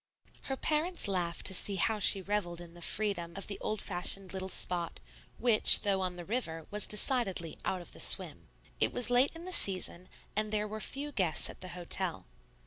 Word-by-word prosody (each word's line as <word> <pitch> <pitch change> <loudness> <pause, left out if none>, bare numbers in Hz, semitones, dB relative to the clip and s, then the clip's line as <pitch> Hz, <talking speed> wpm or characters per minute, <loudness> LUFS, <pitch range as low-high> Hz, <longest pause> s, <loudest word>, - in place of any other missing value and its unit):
Her 270 - -4
parents 315 - -1
laughed 175 -3 -4
to 190 - +1
see 195 +2 +3
how 215 +3 -1
she 195 -1 +5
revelled 190 -4 -4
in 170 -1 -13
the 175 - -16
freedom 175 -3 -4
of 195 - -7
the 200 - -7
old 215 - -4
fashioned 190 +1 -1
little 190 0 -6
spot, 175 -2 0 0.4
which, 230 -3 +5
though 195 -2 -1
on 180 -1 -4
the 175 -1 -10
river, 165 -8 -5
was 210 0 +4
decidedly 210 - 0
"out 185 - -3
of 175 - -15
the - - -12
swim." - - +6 0.3
It - - +4
was 245 -1 -1
late 250 +3 +2
in 330 +1 -11
the 370 - -8
season, 185 - +3 0.3
and 215 0 -2
there 210 0 -3
were 215 +1 -8
few 285 +6 -5
guests 185 - -1
at - - -19
the 185 - -8
hotel. 175 - -4
195 Hz, 200 wpm, -29 LUFS, 175-220 Hz, 0.4 s, swim